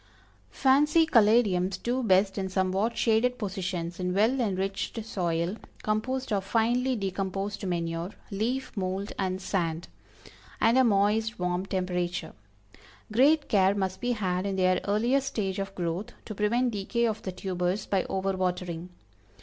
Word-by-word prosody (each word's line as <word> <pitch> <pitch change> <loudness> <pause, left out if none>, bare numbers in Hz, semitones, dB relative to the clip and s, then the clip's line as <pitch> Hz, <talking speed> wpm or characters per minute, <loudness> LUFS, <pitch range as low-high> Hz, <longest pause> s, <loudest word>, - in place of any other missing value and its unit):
Fancy 295 +5 +4
Caladiums 210 - +3
do 250 +2 0
best 195 -2 +3
in 190 -1 -2
somewhat 190 +4 0
shaded 240 +2 +2
positions, 180 -4 -4
in 180 0 -1
well 225 +7 +3
enriched 195 +1 -2
soil, 175 -1 -1 0.3
composed 250 +4 -1
of 195 -1 0
finely 240 +5 +1
decomposed 195 0 -3
manure, 170 0 -2 0.2
leaf 240 +7 -2
mold 190 0 -3
and 185 -1 -1
sand, 170 -3 -2 0.7
and 225 +2 +4
a - - +6
moist, 215 0 +2
warm 180 +1 -1
temperature. 180 -2 -2 0.8
Great 285 +7 +4
care 195 -3 +3
must 190 -2 -2
be 245 0 +1
had 185 -3 -1
in 195 - -2
their 185 -1 +2
earliest 240 +7 +2
stage 195 -6 -2
of 195 0 -4
growth, 175 +3 -3
to 215 - -6
prevent 235 +5 +1
decay 220 +3 -1
of 220 -1 -1
the 185 - -4
tubers 180 +1 -2
by 195 -2 +1
over 195 0 -1
watering. 180 -2 -2
195 Hz, 140 wpm, -28 LUFS, 185-225 Hz, 0.8 s, a